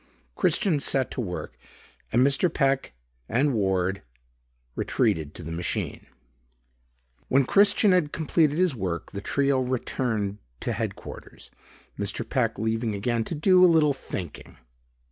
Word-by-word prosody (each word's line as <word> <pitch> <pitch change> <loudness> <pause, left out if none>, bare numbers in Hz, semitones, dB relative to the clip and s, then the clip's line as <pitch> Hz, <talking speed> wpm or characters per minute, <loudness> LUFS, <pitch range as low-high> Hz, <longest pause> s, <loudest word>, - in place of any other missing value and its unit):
Christian 170 -8 +2
set 135 -2 +1
to - - -3
work 90 -6 -5 0.6
and 125 +3 +4
Mr. 140 +5 +2
Peck 135 - 0 0.4
and 135 +5 +2
Ward 95 -3 0 0.7
retreated 75 -2 0
to 85 - -8
the 80 - -6
machine. 85 +1 -3 1.2
When 135 0 +3
Christian 200 - +4
had 175 -5 +2
completed 155 -1 +1
his 180 -3 +2
work, 90 -7 -4
the 100 - -6
trio 140 +4 +1
returned 115 -5 -2 0.2
to - - -2
headquarters, - - -7 0.5
Mr. - - -2
Peck - - 0
leaving 110 0 -1
again 115 +3 0
to - - -4
"do 185 +4 +5
a - - +9
little 155 -3 +4
thinking." 95 - -7
130 Hz, 130 wpm, -26 LUFS, 100-150 Hz, 1.2 s, a